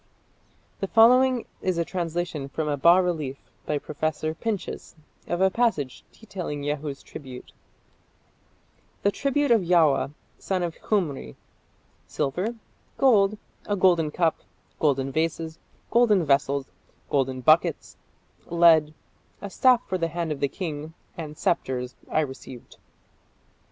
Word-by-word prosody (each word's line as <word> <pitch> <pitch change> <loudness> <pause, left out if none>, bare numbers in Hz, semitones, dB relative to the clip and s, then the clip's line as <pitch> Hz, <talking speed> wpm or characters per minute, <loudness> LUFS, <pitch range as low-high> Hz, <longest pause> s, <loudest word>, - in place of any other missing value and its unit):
The 195 - -2
following 250 +3 +5 0.2
is 185 -2 -1
a 170 - 0
translation 170 -5 -3
from 155 +2 -3
a 145 - 0
bas 170 +6 +5
relief 155 -7 -2 0.3
by 150 - 0
Professor 155 +2 -3
Pinches 205 +1 -5 0.3
of 175 +1 -2
a 190 0 +4
passage 190 - 0
detailing 180 -9 -6
Jehu's 145 -1 -4
tribute: 130 -4 -10 1.5
The 200 - +3
tribute 280 +3 0
of 230 -3 +5
Yaua, 165 -6 +3 0.3
son 185 -2 -1
of 170 -2 -2
Khumri: 150 - -1 0.7
silver, 180 - -2 0.4
gold, 215 -6 +4 0.3
a 205 - +1
golden 175 -5 +3
cup, 165 +1 +1 0.4
golden 135 -3 +1
vases, 160 +1 -2 0.3
golden 215 -7 +4
vessels, 140 -1 +1 0.4
golden 130 -2 0
buckets, 155 +5 +2 0.5
lead, 165 -3 +4 0.4
a 200 - -7
staff 250 +1 +3
for 185 - -2
the 165 - +1
hand 165 0 -3
of 145 - -3
the 140 - +1
king 155 -1 -6 0.2
(and) 155 -3 -7
sceptres, 125 -6 -1 0.2
I 155 - +2
received. 130 -3 -8
165 Hz, 125 wpm, -25 LUFS, 145-190 Hz, 1.5 s, following